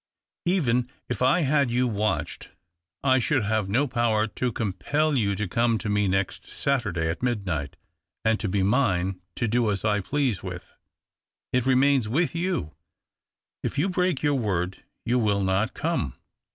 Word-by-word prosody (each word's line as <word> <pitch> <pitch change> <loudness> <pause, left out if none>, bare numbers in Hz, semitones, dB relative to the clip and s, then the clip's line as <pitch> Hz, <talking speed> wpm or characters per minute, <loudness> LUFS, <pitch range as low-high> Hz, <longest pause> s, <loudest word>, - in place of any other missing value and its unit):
Even 125 -9 +2 0.2
if 120 -2 -3
I 130 +7 +4
had 140 -2 +2
you 125 +2 +1
watched 110 -1 -2 0.5
I 130 -1 +4
should 130 +1 +1
have 105 -1 0
no 125 +8 +2
power 120 -4 +1
to 120 +3 -2
compel 120 - 0
you 100 -5 +1
to 105 +1 -2
come 115 +4 +2
to 110 0 -4
me 105 -1 +2
next 95 0 -1
Saturday 100 -12 -1
at 80 +1 -3
midnight 95 - -2 0.5
and 110 0 +3
to 110 - -2
be 95 0 +1
mine, 95 -5 +1
to 120 - -1
do 115 0 +2
as 100 +1 -2
I 105 -1 +2
please 130 0 0
with. 90 -1 -8 0.8
It 125 0 +1
remains 130 -3 +3
with 160 +8 +1
you 170 - -2 0.4
— - - -66
if - - -3
you 170 +7 +2
break 180 -5 0
your 145 -1 +3
word, 95 -8 -1 0.2
you 120 +2 +2
will 100 -3 +1
not 95 +5 0
come. 145 - -1
115 Hz, 165 wpm, -26 LUFS, 100-130 Hz, 0.8 s, I